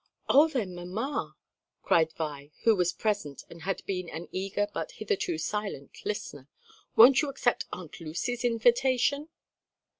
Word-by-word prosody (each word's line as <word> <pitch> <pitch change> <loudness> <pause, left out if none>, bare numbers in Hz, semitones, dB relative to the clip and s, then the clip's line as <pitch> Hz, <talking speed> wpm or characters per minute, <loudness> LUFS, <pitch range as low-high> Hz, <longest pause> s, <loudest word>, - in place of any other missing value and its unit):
"Oh 290 +4 +7
then, 230 - -2
mamma!" 195 +11 -4 0.5
cried 160 -1 +3
Vi, 145 -3 -5
who 225 -1 +5
was 180 -2 +2
present 200 - -2
and 170 - -11
had 190 +3 -3
been 185 -3 -3
an 165 +2 -7
eager 195 +2 -1
but - - -4
hitherto 405 -7 -1
silent 210 - -4
listener, 145 -9 -5 0.5
"won't 250 +5 +8
you 295 - -1
accept 245 -3 0
Aunt 175 -4 -8
Lucy's 180 +10 -3
invitation?" 250 +5 +2
210 Hz, 140 wpm, -29 LUFS, 175-255 Hz, 0.5 s, won't